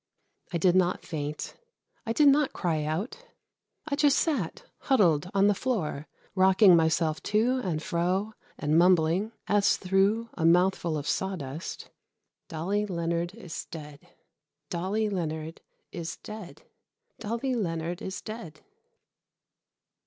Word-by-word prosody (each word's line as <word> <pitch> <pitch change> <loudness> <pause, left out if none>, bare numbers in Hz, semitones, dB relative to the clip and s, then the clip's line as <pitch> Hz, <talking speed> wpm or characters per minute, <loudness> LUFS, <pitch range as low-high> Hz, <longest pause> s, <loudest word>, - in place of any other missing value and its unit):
I 175 - 0
did 180 +2 +3
not 185 -1 +2
faint, 150 -2 -5 0.5
I - - 0
did 295 +4 +5
not 280 0 +4
cry 160 -4 -1
out. 195 - -3 0.6
I 285 - 0
just 290 0 +4
sat 265 - -1 0.2
huddled 180 - +2
on 195 0 +4
the 205 - +5
floor 185 - -2 0.3
rocking 190 0 +6
myself 160 -1 +2
to 230 +5 +2
and 165 -5 -2
fro, 185 +6 -1 0.2
and 155 +2 +2
mumbling, 180 +3 +3
as 205 -1 +3
through 200 +5 +1
a 165 - -4
mouthful 175 -1 +3
of 145 0 -5
sawdust: 165 -5 -4 0.6
"Dolly 195 +6 -1
Leonard 170 0 -2
is 180 -8 -7
dead. 150 -4 -9 0.7
Dolly 190 +5 -1
Leonard 160 -4 -4 0.3
is 170 -1 -5
dead. 215 -5 -10 0.6
Dolly 235 +4 -2
Leonard 170 -5 -2
is 190 - -5
dead." 215 -8 -8
180 Hz, 125 wpm, -28 LUFS, 165-210 Hz, 0.7 s, rocking